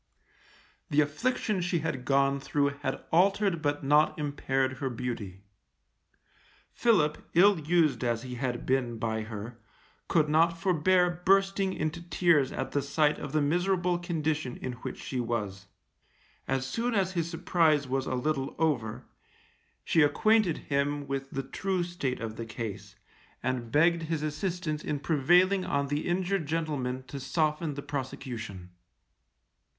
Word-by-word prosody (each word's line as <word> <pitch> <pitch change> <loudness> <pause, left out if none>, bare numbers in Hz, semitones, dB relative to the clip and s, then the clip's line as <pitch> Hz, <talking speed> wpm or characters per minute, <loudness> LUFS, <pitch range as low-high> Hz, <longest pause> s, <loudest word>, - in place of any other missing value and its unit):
The 150 +1 +4
affliction 200 - -1
she 175 -2 0
had 145 -6 -3
gone 140 +1 +2
through 140 +1 +1
had - - -3
altered 195 0 +3
but 145 -1 -1
not 150 +2 +3
impaired 135 -3 -1
her 135 - -1
beauty. 115 -6 -5 1.3
Philip, 170 -11 +2
ill 195 +1 +6
used 155 -5 +2
as 120 -1 0
he 125 -1 -6
had 125 -1 -3
been 125 -3 0
by 110 0 -2
her, 110 +2 -7 0.5
could 155 -2 +3
not 165 +2 +3
forbear 180 0 +2
bursting 195 0 +3
into 155 +1 -3
tears 170 -5 +2
at 135 - -4
the 145 - +1
sight 145 +2 +1
of 145 - -6
the 155 -1 +2
miserable 175 +3 +1
condition 155 -6 -2
in 130 - -4
which 120 - -7
she 130 - -4
was. 105 -5 -3 0.8
As 135 0 0
soon 230 - -1
as 190 -2 +1
his 170 -3 -2
surprise 160 -4 +2
was 135 +1 -1
a - - -1
little 135 +1 -1
over, 135 -9 -1 0.8
she 165 - +3
acquainted 190 +5 +3
him 145 0 -1
with 135 0 -3
the 135 - -3
true 185 +5 -2
state 170 -7 -3
of 110 -1 -5
the 115 - -4
case, 105 -3 -6 0.5
and 125 -3 -2
begged 165 +3 +4
his 160 -1 -2
assistance 155 0 -2
in 150 - -2
prevailing 175 +6 +3
on 140 -3 -1
the 145 +1 -1
injured 180 -1 0
gentleman 145 -5 -2
to 140 +2 -7
soften 150 +2 -1
the 140 - -6
prosecution. 120 -9 -6
150 Hz, 145 wpm, -29 LUFS, 130-170 Hz, 1.3 s, ill